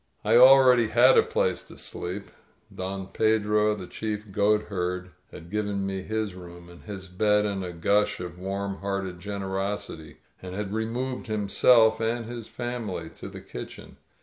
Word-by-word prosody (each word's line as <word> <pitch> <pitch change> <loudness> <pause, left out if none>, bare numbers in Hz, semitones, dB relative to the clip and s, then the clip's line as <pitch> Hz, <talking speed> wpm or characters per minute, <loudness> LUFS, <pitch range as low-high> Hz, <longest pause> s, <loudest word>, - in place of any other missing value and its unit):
I 110 +2 +4
already 125 -2 +7
had 125 +4 +6
a - - +7
place - - 0
to - - -13
sleep. 95 +3 -6 0.4
Don 95 +1 -4
Pedro, 105 0 +2
the 95 -3 -7
chief 105 +2 -5
goatberd, 95 -3 0 0.2
had 85 +1 -11
given 105 -2 -1
me 95 -1 -3
his 110 0 -3
room 85 -1 -11
and 85 0 -14
his 95 -3 -7
bed 105 +3 +2
in 100 -2 -2
a 90 -1 -4
gush 100 +5 +1
of 90 0 -7
warm 100 +1 -3
hearted 100 -3 -3
generosity, 95 -4 -4 0.2
and 90 0 -7
had 100 0 -4
removed 120 +4 -3
himself 110 +2 +4
and 115 +1 -1
his 120 -1 -7
family 115 -9 -5
to - - -9
the - - -10
kitchen. - - -9
100 Hz, 155 wpm, -26 LUFS, 95-110 Hz, 0.4 s, already